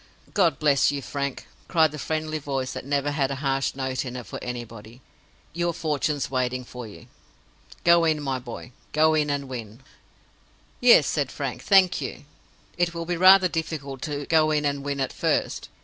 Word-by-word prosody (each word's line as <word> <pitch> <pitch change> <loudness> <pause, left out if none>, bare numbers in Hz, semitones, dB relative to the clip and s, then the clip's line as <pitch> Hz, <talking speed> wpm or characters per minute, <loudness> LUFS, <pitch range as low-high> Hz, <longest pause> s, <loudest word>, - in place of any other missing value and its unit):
"God 170 -9 +3
bless 145 -2 +3
you, 145 - -3
Frank!" 140 0 -4 0.2
cried 160 -4 +3
the 150 - -7
friendly 155 0 -2
voice 135 -3 -3
that - - -7
never 145 0 0
had 140 -2 0
a 140 - -3
harsh 135 -1 -1
note 130 -1 -2
in 125 -2 -6
it 125 -2 -6
for - - -8
anybody. 115 -1 -7 0.5
"Your 170 0 -1
fortune's 150 -3 -1
waiting 130 -1 -1
for 125 -1 -8
you. 105 - -13 0.8
Go 170 0 +6
in, 155 -2 +2
my 135 -3 -2
boy—go 130 +6 -1
in 150 -1 +1
and 140 -1 -2
win." 120 -1 -8 1.0
"Yes," 240 - +7
said 145 -4 -1
Frank. 140 -4 -4
"Thank 190 -2 +4
you. - - -6 0.5
It 175 -1 +1
will 170 0 -4
be 175 +1 -1
rather 185 +2 +7
difficult 150 -5 -4
to 145 -1 -4
go 155 0 +3
in 150 -1 +1
and 140 -1 -1
win, 140 -1 -3
at 135 - -2
first. - - -1
145 Hz, 180 wpm, -25 LUFS, 130-155 Hz, 1.0 s, Yes